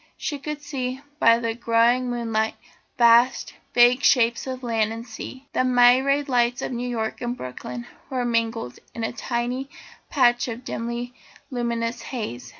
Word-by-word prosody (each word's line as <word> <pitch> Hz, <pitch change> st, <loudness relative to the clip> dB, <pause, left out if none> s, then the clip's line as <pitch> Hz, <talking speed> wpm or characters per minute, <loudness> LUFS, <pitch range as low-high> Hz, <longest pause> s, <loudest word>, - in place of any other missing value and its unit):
She 290 Hz, -3 st, -3 dB
could 300 Hz, +1 st, -6 dB
see, 260 Hz, -4 st, -3 dB, 0.2 s
by 230 Hz, -6 st, +6 dB
the 230 Hz, -1 st, -2 dB
growing 235 Hz, +2 st, +2 dB
moonlight, 225 Hz, -2 st, -1 dB, 0.4 s
vast, 235 Hz, +1 st, +4 dB, 0.2 s
vague 245 Hz, +2 st, +6 dB
shapes 240 Hz, -2 st, +3 dB
of 260 Hz, 0 st, -5 dB
land 225 Hz, -2 st, 0 dB
and 230 Hz, +1 st, -6 dB
sea. 260 Hz, +3 st, -9 dB
The -, -, +2 dB
myriad 255 Hz, +3 st, +4 dB
lights 245 Hz, -2 st, +1 dB
of -, -, -3 dB
New 245 Hz, 0 st, -3 dB
York 220 Hz, -2 st, -3 dB
and 245 Hz, 0 st, -3 dB
Brooklyn 125 Hz, -1 st, -7 dB, 0.2 s
were 255 Hz, -2 st, -1 dB
mingled 230 Hz, -, -1 dB, 0.2 s
in 230 Hz, -, -4 dB
a 225 Hz, -, -1 dB
tiny 245 Hz, +3 st, -3 dB, 0.4 s
patch 245 Hz, -3 st, +3 dB
of 240 Hz, +1 st, -6 dB
dimly 235 Hz, +1 st, -4 dB, 0.4 s
luminous 235 Hz, -1 st, -2 dB
haze. 210 Hz, -, -5 dB
240 Hz, 150 wpm, -24 LUFS, 230-255 Hz, 0.4 s, by